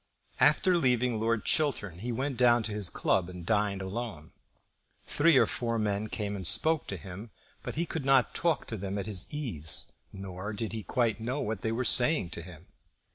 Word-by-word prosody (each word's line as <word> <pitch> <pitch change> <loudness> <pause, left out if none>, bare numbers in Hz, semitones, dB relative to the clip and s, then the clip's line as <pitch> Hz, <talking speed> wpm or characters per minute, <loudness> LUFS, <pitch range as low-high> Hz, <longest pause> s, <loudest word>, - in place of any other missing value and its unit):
After 185 -2 +4
leaving 125 -5 +1
Lord 115 0 0
Chiltern 110 - 0
he 120 +5 -4
went 130 +3 -2
down 120 -1 +4
to 110 - -5
his 105 -3 -1
club 90 -2 0
and 90 -2 -9
dined 105 -1 0
alone. 95 -6 -6 0.7
Three 150 0 +3
or - - +5
four 115 -1 -2
men 105 -1 -1
came 105 -1 -3
and 95 -4 -1
spoke 160 - +3
to 100 - -5
him; 95 +6 -9 0.3
but - - -6
he 170 +3 -1
could 160 -3 -5
not 135 -2 +3
talk 170 -3 0
to 110 - -4
them 100 +1 -4
at 100 - -3
his 95 -2 0
ease, 110 - 0 0.2
nor 95 +1 -7
did 110 +2 -5
he 110 - -4
quite 115 +3 -1
know 125 +5 -3
what 110 -5 -3
they 110 - -1
were 125 +3 -2
saying 120 - +5
to - - -4
him. 85 0 -12
110 Hz, 195 wpm, -29 LUFS, 95-125 Hz, 0.7 s, or